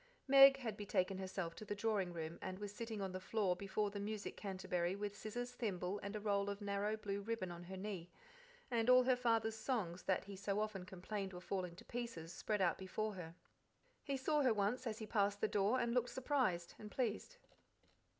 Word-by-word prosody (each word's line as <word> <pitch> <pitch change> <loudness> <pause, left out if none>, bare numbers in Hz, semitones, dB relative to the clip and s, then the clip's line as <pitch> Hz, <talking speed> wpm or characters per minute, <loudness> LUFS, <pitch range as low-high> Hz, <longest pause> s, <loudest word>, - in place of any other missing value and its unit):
Meg 275 0 +10
had 230 -6 -3
betaken 195 -2 0
herself 185 -3 -3
to - - -9
the 205 0 -3
drawing 205 -4 +1
room, 165 -1 -5
and 185 0 -4
was 205 0 -5
sitting 225 -2 -4
on 190 - -2
the 185 - -4
floor 195 -1 +1
before 200 +2 -1
the 200 - -4
music 210 0 -3
canterbury 185 -2 -1
with 205 0 -3
scissors, 245 +4 -4
thimble, 200 -5 -2
and 200 +1 -4
a - - -1
roll 200 -1 +1
of 200 0 -3
narrow 205 +1 0
blue 200 -1 -3
ribbon 215 -4 -2
on 175 0 -8
her 190 +2 -6
knee, 190 -3 -4 0.6
and 230 0 +2
all 255 0 +8
her 255 0 +4
father's 225 -3 +2
songs, 210 -8 -1
that 190 - +1
he 200 0 -8
so 200 +1 -1
often 210 -4 -2
complained 190 +1 -4
were 180 - -6
falling 180 -2 -3
to - - -13
pieces, 230 -9 -5
spread 210 -2 -1
out 175 -3 +3
before 215 +3 -2
her. 170 -3 -7 0.7
He 275 -2 -1
saw 295 +3 +2
her 250 -5 +4
once 215 +5 +1
as 220 -1 -2
he 220 - -5
passed 205 -1 +2
the 215 - +2
door, 210 +5 +2
and 235 -1 +1
looked 245 0 +2
surprised 250 - 0
and 210 - -7
pleased. 230 -2 -2
205 Hz, 210 wpm, -39 LUFS, 190-225 Hz, 0.7 s, Meg